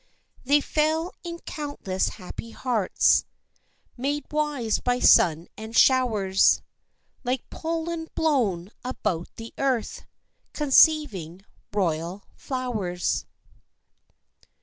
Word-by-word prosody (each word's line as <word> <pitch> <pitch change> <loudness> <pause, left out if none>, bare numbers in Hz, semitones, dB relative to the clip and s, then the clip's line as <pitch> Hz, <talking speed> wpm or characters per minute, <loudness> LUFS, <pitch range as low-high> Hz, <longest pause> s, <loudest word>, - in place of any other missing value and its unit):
They 285 +3 +4
fell 315 +4 0
in 340 -1 -5
countless 285 - -3
happy 210 +3 -9
hearts, 230 -4 +2 0.7
Made 285 +4 -2
wise 295 -7 0
by 245 0 0
sun 165 -8 +5
and 220 +2 -5
showers, 215 -8 +4 0.6
Like 250 0 -2
pollen 330 0 -3
blown 215 - 0
about 180 -9 -2
the 225 0 -9
earth, 260 -5 -1 0.5
Conceiving 260 - +3 0.3
royal 175 -1 -1
flowers. 220 -10 -3
245 Hz, 85 wpm, -25 LUFS, 195-295 Hz, 0.7 s, sun